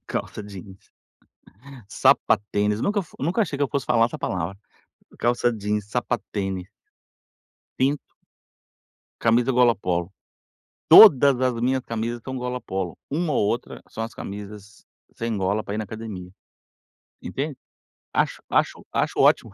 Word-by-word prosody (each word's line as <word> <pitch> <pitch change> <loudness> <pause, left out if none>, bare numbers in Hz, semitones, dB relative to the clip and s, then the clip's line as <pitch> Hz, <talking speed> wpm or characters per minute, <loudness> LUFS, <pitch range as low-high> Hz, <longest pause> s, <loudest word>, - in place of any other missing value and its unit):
Calça 105 - -4
jeans, 95 -1 -10 1.1
sapatênis. 105 +1 +2
Nunca 205 0 +1
f - - -18
nunca 175 - +1
achei 150 -7 -3
que 145 - -2
eu 140 - +1
fosse 140 -3 -2
falar 115 -2 +4
essa - - -7
palavra. 90 +1 -3 0.6
Calça 120 0 +1
jeans, 105 -1 -2
sapatênis 100 -5 -3 1.1
cinto 140 +3 +2 1.3
camisa 120 +3 +3
gola 120 -1 +5
polo. 90 -2 -2 0.8
Todas 140 - +9
as 130 -1 +2
minhas 130 +1 +1
camisas 115 +1 -3
são 130 0 -5
gola 125 0 -3
polo. 95 -6 -4
Uma 155 0 0
ou 105 - +2
outra 115 - -3
são 110 - -5
as 115 - -6
camisas 105 +1 -9 0.3
sem 115 -2 -3
gola, 100 +3 0
para 100 - -5
ir - - -3
na 110 - -2
academia, 100 -4 -8 0.9
entende? 140 0 -4 0.6
Acho - - 0
acho - - +1
acho - - 0
ótimo. - - +4
115 Hz, 135 wpm, -24 LUFS, 100-130 Hz, 1.3 s, Todas